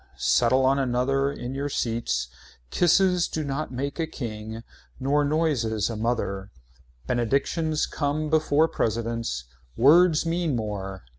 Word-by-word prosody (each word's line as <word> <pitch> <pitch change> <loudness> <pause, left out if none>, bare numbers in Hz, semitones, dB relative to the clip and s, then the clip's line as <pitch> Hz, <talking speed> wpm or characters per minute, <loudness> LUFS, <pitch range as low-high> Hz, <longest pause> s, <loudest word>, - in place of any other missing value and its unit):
Settle 130 +2 +3
on 135 +1 +3
another 135 +2 +1
in 125 -2 -6
your 140 +1 -3
seats. 115 - -1 0.4
Kisses 180 0 +3
do 155 - -3
not 140 +1 -3
make 140 +5 -4
a 165 - 0
king. 110 -5 -6 0.4
Nor 145 +3 +2
noises 135 -9 0
a - - -4
mother. 105 -4 -2 0.6
Benedictions 140 +6 0
come 150 +1 -2
before 155 0 +3
presidents. 115 - -2 0.3
Words 160 +5 +5
mean 165 -3 0
more. 100 - -4
135 Hz, 125 wpm, -25 LUFS, 115-155 Hz, 0.6 s, Words